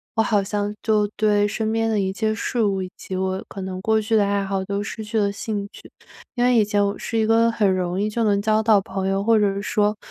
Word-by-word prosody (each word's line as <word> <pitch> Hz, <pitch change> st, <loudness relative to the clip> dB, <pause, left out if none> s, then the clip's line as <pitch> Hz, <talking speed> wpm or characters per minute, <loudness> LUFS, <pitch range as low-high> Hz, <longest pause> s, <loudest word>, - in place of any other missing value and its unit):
我 225 Hz, -, +3 dB
好 205 Hz, -2 st, +1 dB
像 205 Hz, +1 st, -2 dB
就 215 Hz, -2 st, +2 dB
对 205 Hz, -1 st, +3 dB
身 220 Hz, +1 st, -2 dB
边 225 Hz, 0 st, 0 dB
的 215 Hz, -2 st, +1 dB
一 190 Hz, 0 st, -1 dB
切 220 Hz, +1 st, 0 dB
事 235 Hz, +1 st, -2 dB
物 195 Hz, -2 st, 0 dB
以 185 Hz, -, -8 dB
及 190 Hz, -, -7 dB
我 190 Hz, 0 st, -2 dB
可 195 Hz, -, -8 dB
能 185 Hz, 0 st, -5 dB
过 220 Hz, +1 st, +2 dB
去 220 Hz, +1 st, 0 dB
的 210 Hz, -, +4 dB
爱 200 Hz, -1 st, 0 dB
好 195 Hz, -1 st, -2 dB
都 200 Hz, +1 st, -2 dB
失 220 Hz, +1 st, -6 dB
去 220 Hz, +2 st, -3 dB
了 200 Hz, -1 st, +1 dB
兴 200 Hz, 0 st, -4 dB
趣。 -, -, -14 dB, 0.4 s
因 245 Hz, -1 st, +2 dB
为 250 Hz, -1 st, +4 dB
以 220 Hz, -, +5 dB
前 205 Hz, 0 st, +1 dB
我 200 Hz, +1 st, -1 dB
是 230 Hz, -, -3 dB
一 220 Hz, -, +2 dB
个 230 Hz, +1 st, +3 dB
很 205 Hz, -4 st, +2 dB
容 180 Hz, 0 st, -2 dB
易 210 Hz, -, +1 dB
就 230 Hz, +2 st, -1 dB
能 200 Hz, -2 st, +2 dB
交 215 Hz, +1 st, +2 dB
到 220 Hz, -2 st, +4 dB
朋 190 Hz, 0 st, -4 dB
友， 195 Hz, +1 st, 0 dB
或 225 Hz, 0 st, +4 dB
者 200 Hz, -1 st, +1 dB
说， 210 Hz, 0 st, +1 dB
205 Hz, 285 characters per minute, -22 LUFS, 195-220 Hz, 0.4 s, 以